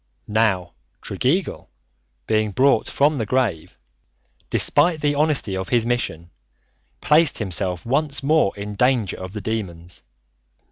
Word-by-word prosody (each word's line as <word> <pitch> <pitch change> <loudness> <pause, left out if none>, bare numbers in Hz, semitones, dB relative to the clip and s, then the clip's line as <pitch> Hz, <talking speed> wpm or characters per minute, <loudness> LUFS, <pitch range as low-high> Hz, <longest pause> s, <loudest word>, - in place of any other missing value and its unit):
Now 105 -5 +1 0.3
Tregeagle 170 +9 -1 0.6
being 110 -1 +1
brought 135 +4 +3
from 145 +1 +1
the 110 - -1
grave, 110 -10 -1 0.7
despite 170 -2 +2
the 145 -1 +1
honesty 145 -9 0
of 95 0 -4
his 120 -2 +2
mission, 85 -9 -2 0.7
placed 155 -1 +3
himself 95 -3 -2
once 140 +3 -1
more 155 -7 +3
in 105 +1 -6
danger 120 -2 +1
of 95 0 -8
the 105 - -5
demons. 90 -5 -5
115 Hz, 125 wpm, -22 LUFS, 95-140 Hz, 0.7 s, brought